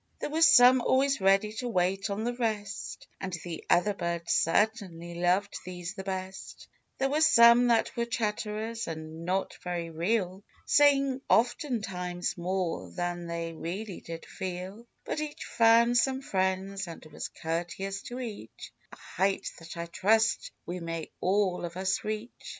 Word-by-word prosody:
There - - -4
were 320 +2 0
some 255 -5 +8
always 270 0 +2
ready 195 +2 +3
to 250 - -3
wait 190 0 0
on 200 +2 -2
the 240 +1 -1
rest, 215 -4 -3
And 190 -1 -5
the 170 -2 -6
other 205 +4 +4
birds 170 -2 -2
certainly 175 -3 +1
loved 180 +4 +1
these 180 0 -6
the 190 -1 -7
best; 190 0 -6 0.3
There 270 0 0
were 300 +2 +1
some 235 -4 +7
that 230 -2 +2
were 235 0 -1
chatterers, 220 0 -2
and 160 0 -7
not 190 +2 -1
very 175 -2 -3
real, 185 +3 -1 0.2
Saying 275 -2 +4
oftentimes 200 - 0
more 180 0 -2
than 175 -1 -3
they 170 0 -4
really 185 +5 -5
did 165 0 -8
feel; 190 +5 -6 0.2
But 305 - -2
each 300 -1 -5
found 235 +1 +5
some 265 +1 0
friends, 190 -1 -1
and 165 -2 -9
was 155 - -6
courteous 175 +4 -4
to 245 +1 -6
each 215 - -8
— - - -36
A - - -10
height 195 +1 -1
that 165 +1 -10
I 170 - -3
trust 220 +6 +2 0.2
we 180 +1 -4
may 165 -1 -5
all 190 -1 +1
of 170 +1 -5
us 190 0 0
reach. 215 +3 -4
195 Hz, 155 wpm, -29 LUFS, 175-230 Hz, 0.3 s, some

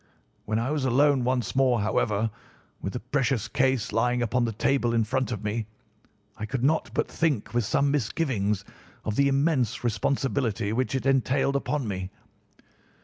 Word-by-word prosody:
When 110 - -1
I 120 +5 -1
was 150 -3 -1
alone 135 +1 +3
once 125 0 -1
more, 130 -3 +3
however, 110 +1 0 0.5
with 95 - -4
the 125 - -3
precious 125 -3 0
case 130 -2 +1
lying 120 +1 +2
upon 120 +2 +1
the 115 - -1
table 120 +1 +1
in 115 - +3
front 130 +3 -1
of 110 -3 -4
me, 105 +1 -2 0.7
I 110 - -5
could 130 0 -3
not 155 +4 +2
but - - +1
think 150 -11 -1
with 120 -2 +1
some 140 +6 +2
misgivings 105 - 0 0.4
of 110 - -1
the 140 +3 +4
immense 135 -5 +1
responsibility 120 -2 0
which 130 +3 0
it 130 - -2
entailed 135 +1 +2
upon 140 -2 -1
me. 95 -2 -3
125 Hz, 165 wpm, -26 LUFS, 110-135 Hz, 0.7 s, the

